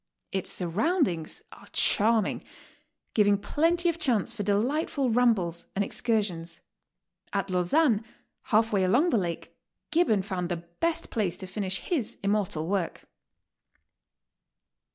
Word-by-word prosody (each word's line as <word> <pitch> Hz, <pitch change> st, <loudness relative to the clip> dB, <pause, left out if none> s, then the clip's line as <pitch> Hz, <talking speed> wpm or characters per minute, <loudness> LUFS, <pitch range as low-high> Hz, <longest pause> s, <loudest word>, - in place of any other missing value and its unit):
Its 190 Hz, -2 st, -1 dB
surroundings 185 Hz, -, 0 dB
are -, -, -14 dB
charming, 220 Hz, 0 st, +2 dB, 0.7 s
giving 205 Hz, -2 st, +4 dB
plenty 330 Hz, -, +1 dB
of 335 Hz, -1 st, 0 dB
chance 235 Hz, -6 st, +1 dB
for 230 Hz, -, -4 dB
delightful 250 Hz, -, +1 dB
rambles 205 Hz, -8 st, +2 dB
and 200 Hz, +1 st, +1 dB
excursions. 200 Hz, -9 st, -1 dB, 0.7 s
At 195 Hz, -1 st, -1 dB
Lausanne, 210 Hz, -, +3 dB, 0.4 s
half 220 Hz, 0 st, +2 dB
way 195 Hz, -2 st, +3 dB
along 250 Hz, -, +3 dB
the 230 Hz, -, +3 dB
lake, 170 Hz, -3 st, -4 dB, 0.4 s
Gibbon 300 Hz, -, +3 dB
found 185 Hz, -3 st, -3 dB
the 175 Hz, -, -1 dB, 0.2 s
best 335 Hz, -1 st, -1 dB
place 205 Hz, -7 st, -1 dB
to 190 Hz, -, -5 dB
finisih 190 Hz, 0 st, -2 dB
his 295 Hz, -, -2 dB
immortal 200 Hz, -6 st, 0 dB
work. 190 Hz, -3 st, -2 dB
205 Hz, 120 wpm, -28 LUFS, 185-245 Hz, 0.7 s, giving